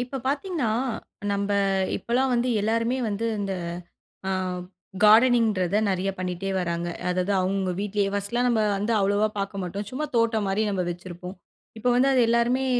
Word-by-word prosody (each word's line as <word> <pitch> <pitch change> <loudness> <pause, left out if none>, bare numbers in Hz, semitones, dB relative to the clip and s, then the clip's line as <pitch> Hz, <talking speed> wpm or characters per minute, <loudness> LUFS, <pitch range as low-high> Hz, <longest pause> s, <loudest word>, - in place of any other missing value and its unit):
இப்ப 250 +2 -4
பார்த்தீங்னா, 295 - -1 0.6
நம்ம 200 0 -1 0.5
இப்போலாம் 255 +3 0
வந்து 240 +1 +1
எல்லாருமே 230 +4 0
வந்து, 210 +2 -2 0.2
இந்த 195 -1 -2 0.8
ஆ - - 0 0.7
கார்டனிங்ன்றத 215 -4 +5
நிறைய 190 +1 0
பண்ணிட்டே 185 +1 -3
வராங்க. 170 -1 -2 0.2
அதாவது 180 +2 0
அவங்க 185 +1 0
அவங்க 185 - -1
வீட்டிலேயே. 205 -1 0
ஃபர்ஸ்ட்டுலாம் 235 +5 0
நம்ம 235 -3 +2 0.2
வந்து 210 +4 0
அவ்வளோவா 205 +2 +2
பார்க்க 195 0 -3
மாட்டோம். 195 +4 -4
சும்மா 275 +6 -3
தோட்டம் 230 -2 +2
மாரி 195 +3 +1
நம்ம 190 -3 -1
வச்சிருப்போம். 175 +1 -7 0.4
இப்போ 225 +3 0
வந்து 260 +2 +4
அது 255 - +4
எல்லாருமே 235 +3 +2
210 Hz, 150 wpm, -25 LUFS, 195-240 Hz, 0.8 s, கார்டனிங்ன்றத